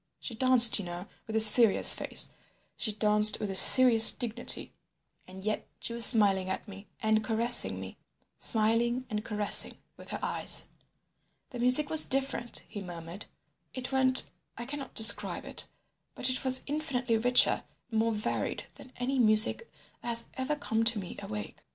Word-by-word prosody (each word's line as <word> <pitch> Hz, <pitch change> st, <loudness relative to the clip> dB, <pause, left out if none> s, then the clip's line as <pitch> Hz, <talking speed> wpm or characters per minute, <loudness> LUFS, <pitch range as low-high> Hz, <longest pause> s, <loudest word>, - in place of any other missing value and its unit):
She 240 Hz, -, -9 dB
danced, 245 Hz, -2 st, +5 dB
you 200 Hz, -, -8 dB
know, 175 Hz, +1 st, -10 dB, 0.2 s
with 220 Hz, -, -8 dB
a -, -, 0 dB
serious 220 Hz, 0 st, +6 dB
face; -, -, -4 dB, 0.4 s
she 220 Hz, -, -4 dB
danced 210 Hz, 0 st, +2 dB
with 205 Hz, -, -6 dB
a -, -, -8 dB
serious 235 Hz, +1 st, +7 dB
dignity, 240 Hz, -1 st, -4 dB, 0.5 s
and 190 Hz, +1 st, -14 dB
yet 215 Hz, -, -5 dB
she 235 Hz, -, -7 dB
was 235 Hz, 0 st, +5 dB
smiling 195 Hz, -5 st, +1 dB
at 190 Hz, -, -7 dB
me 200 Hz, 0 st, -14 dB, 0.2 s
and 220 Hz, 0 st, -1 dB
caressing 230 Hz, +2 st, +1 dB
me—smiling 235 Hz, +3 st, -5 dB
and 210 Hz, 0 st, -5 dB
caressing 210 Hz, -2 st, +1 dB, 0.2 s
with -, -, -16 dB
her -, -, -6 dB
eyes. -, -, -1 dB, 0.8 s
"The 245 Hz, -, -10 dB
music 255 Hz, +5 st, +2 dB
was 315 Hz, -1 st, +7 dB
different," 265 Hz, -3 st, -5 dB
he 205 Hz, -, -11 dB
murmured. 175 Hz, +1 st, -11 dB, 0.5 s
"It 255 Hz, 0 st, -8 dB
went—I 260 Hz, -2 st, -2 dB
cannot 275 Hz, 0 st, -10 dB
describe 220 Hz, 0 st, +1 dB
it; -, -, -6 dB, 0.5 s
but 255 Hz, -, -2 dB
it 255 Hz, -, -5 dB
was 260 Hz, -1 st, +2 dB
infinitely 260 Hz, -6 st, -4 dB
richer 245 Hz, +2 st, +3 dB, 0.3 s
and 220 Hz, -, -3 dB
more 230 Hz, +1 st, -2 dB
varied 210 Hz, -1 st, -6 dB
than 255 Hz, -, -17 dB
any 260 Hz, +2 st, -5 dB
music 215 Hz, -, +3 dB, 0.3 s
that -, -, -12 dB
has 235 Hz, 0 st, 0 dB
ever 265 Hz, +3 st, -5 dB
come 225 Hz, -6 st, -4 dB
to 230 Hz, 0 st, 0 dB
me 185 Hz, -3 st, -10 dB
awake. 105 Hz, -1 st, -10 dB
230 Hz, 160 wpm, -26 LUFS, 210-255 Hz, 0.8 s, serious